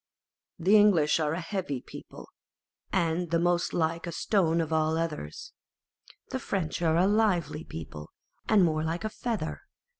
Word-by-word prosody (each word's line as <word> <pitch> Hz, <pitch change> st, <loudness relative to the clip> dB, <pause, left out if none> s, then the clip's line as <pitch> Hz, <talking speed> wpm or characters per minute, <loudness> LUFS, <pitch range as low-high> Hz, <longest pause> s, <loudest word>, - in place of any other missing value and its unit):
The 190 Hz, +4 st, +4 dB
English 180 Hz, -8 st, +4 dB
are 150 Hz, -1 st, 0 dB
a 165 Hz, -, -2 dB
heavy 170 Hz, -6 st, -3 dB
people, -, -, -11 dB, 0.6 s
and 170 Hz, -1 st, 0 dB
the 170 Hz, -, +2 dB
most 175 Hz, +1 st, +1 dB
like 165 Hz, +1 st, -1 dB
a -, -, -3 dB
stone 170 Hz, -2 st, +1 dB
of 160 Hz, -1 st, -1 dB
all 160 Hz, 0 st, +2 dB
others. 155 Hz, -, -4 dB, 0.8 s
The 260 Hz, -, -2 dB
French 180 Hz, -9 st, -3 dB
are 165 Hz, -1 st, +3 dB
a 180 Hz, -, +4 dB
lively 195 Hz, -7 st, +1 dB
people, 80 Hz, -, -8 dB, 0.4 s
and 210 Hz, -3 st, +5 dB
more 155 Hz, -1 st, 0 dB
like 165 Hz, +4 st, -2 dB
a 215 Hz, -, -1 dB
feather. 215 Hz, -7 st, -4 dB
165 Hz, 155 wpm, -28 LUFS, 160-190 Hz, 0.8 s, and